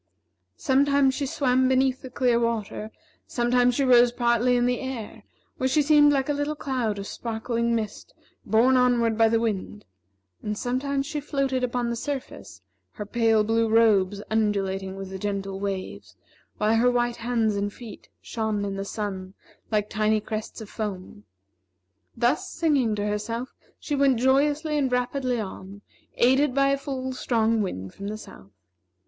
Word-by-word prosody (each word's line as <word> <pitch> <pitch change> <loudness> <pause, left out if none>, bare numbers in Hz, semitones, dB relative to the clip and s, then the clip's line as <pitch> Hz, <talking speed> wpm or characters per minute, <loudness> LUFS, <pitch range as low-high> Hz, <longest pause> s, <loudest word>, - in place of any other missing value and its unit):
Sometimes 280 -1 +3
she 280 0 -2
swam 260 -1 +2
beneath 260 0 +2
the 260 - -8
clear 245 -2 +1
water; 225 -2 -2 0.4
sometimes 245 0 +2
she 280 - +1
rose 245 -2 +6
partly 240 0 +2
in 245 0 +2
the 245 0 0
air, 230 -4 -6 0.4
where 260 - 0
she 295 +3 +3
seemed 295 0 +6
like 270 -2 +1
a 295 - +1
little 290 +1 -2
cloud 250 -8 -2
of 200 - -5
sparkling 235 +1 -2
mist 215 -2 -5 0.3
borne 235 +4 +3
onward 240 -3 +3
by 225 0 +4
the 225 0 +2
wind; 210 -2 -3 0.6
and 210 0 -4
sometimes 275 +3 -1
she 300 +1 -3
floated 275 -3 -1
upon 245 -1 -1
the - - -2
surface, 100 - -6 0.3
her 210 - -6
pale 225 0 +2
blue 225 +1 +1
robes 205 -3 +3
undulating 195 -3 -1
with 195 -1 -7
the 190 - -6
gentle 195 -1 -3
waves, 195 -1 -5 0.4
while 215 +2 +2
her 245 +2 +4
white 240 -1 0
hands 230 -2 0
and 200 0 -2
feet 230 0 -12
shone 220 -3 -2
in 195 -1 -4
the 195 - -3
sun 195 -2 -5 0.3
like 210 -2 0
tiny 215 0 +1
crests 215 +2 -6
of 220 - -8
foam. 185 - -6 0.9
Thus, 240 +5 +1
singing 285 -10 +1
to 205 0 -2
herself, 230 +4 -3 0.3
she 295 - -5
went 275 -3 +3
joyously 290 +4 +2
and 265 -3 0
rapidly 250 0 -1
on, 200 0 -8 0.3
aided 265 +2 +3
by 275 0 +3
a 275 - +2
full, 260 -2 -4
strong 230 -3 +1
wind 95 - -5
from 200 - -7
the 215 +1 -4
south. 100 - -13
235 Hz, 165 wpm, -25 LUFS, 210-260 Hz, 0.9 s, rose